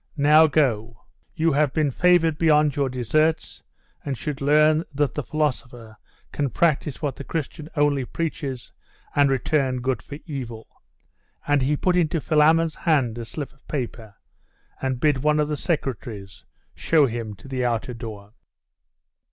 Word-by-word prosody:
Now 150 +2 +6
go; 115 -7 0 0.3
you 165 0 +2
have 145 -1 +2
been 155 -3 +1
favoured 165 0 +3
beyond 150 -3 +3
your 140 -2 0
deserts, 150 +6 0 0.4
and 135 -3 -3
should 145 +1 -5
learn 155 +2 +4
that 145 -2 0
the 150 - -2
philosopher 125 -6 -3 0.4
can 145 -2 -1
practise 155 +1 0
what 145 -2 -2
the - - -7
Christian 155 +1 -5
only 145 -2 +2
preaches, 140 -5 -5 0.4
and 145 -1 +4
return 135 -1 0
good 125 -2 -1
for 145 - -9
evil.' 120 -7 -8 0.7
And 145 -1 +3
he 145 +3 +1
put 180 +3 +1
into 165 -2 +1
Philammon's 160 +2 +3
hand 140 -10 +1
a 115 - -5
slip 140 +5 -7
of 135 - -30
paper, 115 -6 -5 0.7
and 130 -2 -2
bid 145 -1 +2
one 150 +1 +2
of 150 0 +1
the 150 - -1
secretaries 120 - -4 0.3
show 155 -3 +3
him 115 -4 -4
to 100 - -15
the 130 -1 -2
outer 120 +1 -1
door. 110 -3 -9
145 Hz, 150 wpm, -23 LUFS, 125-155 Hz, 0.7 s, Now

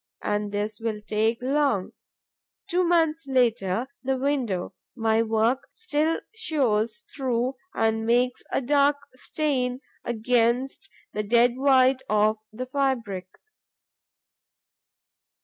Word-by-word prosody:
And 210 0 -1
this 205 +1 -3
will 225 -2 -2
take 215 +2 0
long. 270 -7 +1 0.8
Two 365 -1 +1
months 330 -2 +2
later, 235 -5 +1 0.2
the 265 0 0
window 255 -9 -1 0.2
my 225 -2 +2
work 225 +3 +1
still 320 -7 0
shows 250 - 0
through 255 -1 0 0.2
and 225 0 +1
makes 245 +2 +2
a - - +1
dark 285 +2 +3 0.2
stain 255 -2 -1 0.2
against 240 - 0 0.2
the 210 - -1
dead 235 +3 +3
white 260 -1 +4
of 215 +1 +3
the 245 +4 -5
fabric. 250 -9 -1
245 Hz, 105 wpm, -25 LUFS, 220-275 Hz, 0.8 s, white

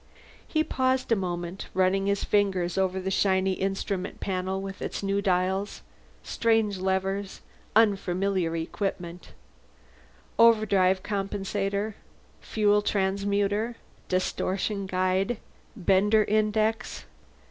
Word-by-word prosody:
He 310 -1 +1
paused 260 -4 0
a - - +6
moment, 175 -1 -4
running 190 +1 +2
his 200 0 0
fingers 190 -4 +1
over 190 0 0
the 190 +1 -3
shiny 190 -1 +2
instrument 195 0 -3
panel 190 0 -2
with 195 0 -7
its - - -4
new 200 0 0
dials, 190 +1 0 0.4
strange 225 -4 +1
levers, 190 +1 -2 0.3
unfamiliar 195 -4 +2
instruments. 175 +1 -4 1.1
Overdrive 200 -5 +4
Compensator. 200 +1 -2 0.5
Fuel 210 -1 +2
Transmuter. 200 +3 0 0.3
Distortion 190 +2 -1
Guide. 185 +4 0 0.4
Bender 205 +3 +3
Index. 215 +1 0
195 Hz, 95 wpm, -27 LUFS, 185-210 Hz, 1.1 s, a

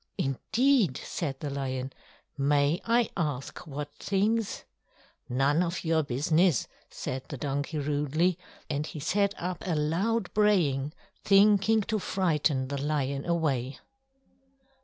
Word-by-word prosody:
"Indeed!" 220 - +2
said 140 -6 -4
the 145 - -3
lion. 130 -1 -3 0.4
"May 145 +3 +2
I 235 0 +2
ask 145 -7 -3
what 145 0 -6
things?" 210 +2 0 0.7
"None 135 +6 +2
of 170 0 -2
your 160 0 +3
business!" 155 - +2 0.2
said 130 0 -5
the 140 - -5
donkey 145 +3 -2
rudely; 150 +5 0 0.3
and 150 +1 -2
he 155 - -7
set 200 +6 +1
up 180 0 -3
a 175 -3 -1
loud 180 +8 0
braying, 160 -10 +2 0.3
thinking 210 +2 +5
to 215 +1 -1
frighten 150 -9 0
the 140 -1 -3
lion 140 -2 -1
away. 140 -6 0
155 Hz, 120 wpm, -28 LUFS, 140-190 Hz, 0.7 s, thinking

